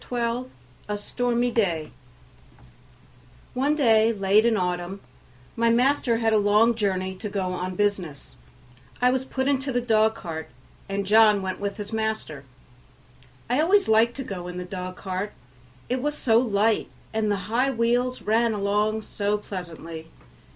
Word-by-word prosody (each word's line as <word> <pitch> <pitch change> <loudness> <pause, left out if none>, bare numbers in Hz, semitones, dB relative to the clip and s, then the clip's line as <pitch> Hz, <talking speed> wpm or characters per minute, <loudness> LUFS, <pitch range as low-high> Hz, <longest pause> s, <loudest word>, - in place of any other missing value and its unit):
12 245 +1 -2 0.4
A 210 - -1
Stormy 245 +3 -1
Day 170 -10 0 1.6
One 280 +4 +1
day 225 -6 +4
late 205 +1 +3
in 230 - +3
the - - 0
autumn 180 +1 -2 0.6
my 230 0 +2
master 245 0 +2
had 225 -1 +1
a 215 - +5
long 210 +3 +4
journey 190 -4 -1
to 210 +2 -5
go 190 -2 -2
on 180 0 -4
business. 190 -8 -2 0.6
I 250 0 +4
was 260 0 0
put 265 0 -2
into 275 -1 0
the 245 - +1
dog 220 -2 +2
cart, 165 -7 -6 0.4
and 200 0 -2
John 210 -1 +5
went 185 0 -3
with 200 +2 -3
his 210 +1 -7
master. 220 -10 -3 1.0
I 250 +5 +2
always 395 +5 +3
liked 225 +2 +4
to 270 - -4
go 180 -6 -6
in 180 0 -6
the 180 - -5
dog 185 0 -6
cart, 190 +1 -4 0.5
it 250 +1 -1
was 295 +2 -1
so 225 -2 +4
light 220 -2 +1 0.2
and 220 -1 0
the 205 - +2
high 240 +6 +1
wheels 245 +1 0
ran 225 +1 +2
along 210 +2 0
so 205 0 -1
pleasantly. 170 -5 -8
215 Hz, 160 wpm, -25 LUFS, 195-235 Hz, 1.6 s, a